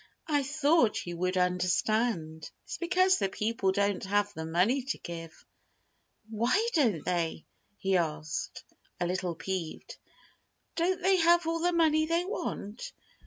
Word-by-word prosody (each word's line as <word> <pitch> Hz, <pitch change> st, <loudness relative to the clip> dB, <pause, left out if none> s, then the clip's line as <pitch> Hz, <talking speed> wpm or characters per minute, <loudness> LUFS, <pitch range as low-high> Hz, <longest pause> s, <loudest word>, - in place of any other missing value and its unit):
"I 295 Hz, -2 st, +2 dB
thought 295 Hz, -2 st, +2 dB
you 175 Hz, -1 st, -5 dB
would 185 Hz, +1 st, -1 dB
understand. 180 Hz, -1 st, 0 dB
It's -, -, -7 dB
because 370 Hz, +2 st, +3 dB
the 195 Hz, -, 0 dB
people 210 Hz, -1 st, 0 dB
don't 200 Hz, 0 st, 0 dB
have 205 Hz, +1 st, +1 dB
the 160 Hz, 0 st, -5 dB
money 185 Hz, +12 st, +2 dB
to 265 Hz, +3 st, -3 dB
give." 165 Hz, -1 st, -9 dB, 0.9 s
"Why 250 Hz, -, +1 dB
don't 230 Hz, -, +2 dB
they?" 170 Hz, -3 st, -1 dB, 0.3 s
he 190 Hz, -1 st, +1 dB
asked, 155 Hz, -2 st, -3 dB, 0.4 s
a 175 Hz, -, 0 dB
little 180 Hz, -1 st, -2 dB
peeved. 185 Hz, -2 st, -5 dB, 0.8 s
"Don't 365 Hz, +2 st, 0 dB
they 380 Hz, 0 st, +4 dB
have 340 Hz, 0 st, +4 dB
all 330 Hz, 0 st, -1 dB
the 350 Hz, +2 st, +2 dB
money 315 Hz, -2 st, +3 dB
they 335 Hz, +2 st, +1 dB
want?" 245 Hz, -, -5 dB
210 Hz, 140 wpm, -29 LUFS, -, 0.9 s, they